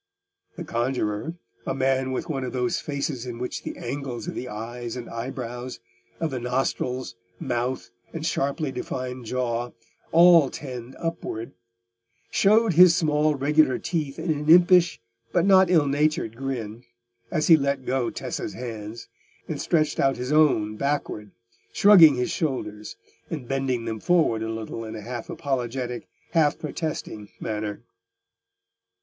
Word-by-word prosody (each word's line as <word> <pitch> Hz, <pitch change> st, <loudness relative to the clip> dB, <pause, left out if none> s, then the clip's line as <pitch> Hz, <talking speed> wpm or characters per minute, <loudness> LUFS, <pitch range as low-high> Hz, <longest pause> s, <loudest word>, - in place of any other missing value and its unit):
The -, -, -4 dB
conjuror—a 115 Hz, +1 st, -3 dB
man 130 Hz, 0 st, +1 dB
with 130 Hz, -, -3 dB
one 135 Hz, -5 st, -2 dB
of 125 Hz, -, -4 dB
those 125 Hz, -1 st, 0 dB
faces 140 Hz, -3 st, -3 dB
in 120 Hz, -1 st, -5 dB
which 125 Hz, +1 st, -4 dB
the -, -, -6 dB
angles 135 Hz, +2 st, -5 dB
of 175 Hz, -, -3 dB
the 125 Hz, -, -5 dB
eyes 115 Hz, +2 st, -6 dB
and 125 Hz, -2 st, -6 dB
eyebrows, 125 Hz, +1 st, -6 dB, 0.4 s
of 160 Hz, -2 st, -1 dB
the 130 Hz, -, -3 dB
nostrils, 125 Hz, -2 st, -2 dB, 0.3 s
mouth, 120 Hz, -6 st, -2 dB, 0.2 s
and 160 Hz, -1 st, -5 dB
sharply 140 Hz, -1 st, -1 dB
defined 125 Hz, -1 st, -5 dB
jaw, 120 Hz, 0 st, -2 dB, 0.4 s
all 170 Hz, -4 st, +7 dB
tend 125 Hz, -3 st, -8 dB
upward—showed 115 Hz, -, -2 dB
his 175 Hz, +1 st, +8 dB
small 155 Hz, -3 st, +2 dB
regular 145 Hz, 0 st, +3 dB
teeth 150 Hz, -5 st, -3 dB
in 170 Hz, -, -1 dB
an 150 Hz, 0 st, -2 dB
impish 175 Hz, -6 st, +6 dB, 0.3 s
but 175 Hz, 0 st, +2 dB
not 190 Hz, -2 st, +6 dB
ill 165 Hz, -5 st, +4 dB
natured 145 Hz, -5 st, 0 dB
grin, 120 Hz, -3 st, -5 dB, 0.5 s
as 155 Hz, -, 0 dB
he 165 Hz, -, +8 dB
let 140 Hz, -3 st, -1 dB
go 130 Hz, -2 st, 0 dB
Tessa's -, -, -5 dB
hands, 115 Hz, -2 st, -7 dB, 0.4 s
and 155 Hz, -3 st, -4 dB
stretched 155 Hz, -3 st, +1 dB
out 135 Hz, 0 st, +2 dB
his 125 Hz, +3 st, -4 dB
own 120 Hz, -9 st, +3 dB
backward, 140 Hz, -7 st, -2 dB, 0.4 s
shrugging 175 Hz, -8 st, +8 dB
his 125 Hz, 0 st, -1 dB
shoulders, 115 Hz, -, -3 dB, 0.3 s
and 145 Hz, -7 st, -5 dB
bending 135 Hz, -3 st, -1 dB
them 110 Hz, -1 st, -3 dB
forward 160 Hz, -8 st, +2 dB
a 110 Hz, -, -3 dB
little 115 Hz, 0 st, -5 dB
in 110 Hz, -, -7 dB
a -, -, -6 dB
half 125 Hz, +9 st, -6 dB
apologetic, 125 Hz, -5 st, -3 dB, 0.2 s
half 160 Hz, -3 st, +3 dB
protesting 150 Hz, -9 st, -5 dB
manner. 105 Hz, 0 st, -4 dB
130 Hz, 140 wpm, -25 LUFS, 115-155 Hz, 0.5 s, his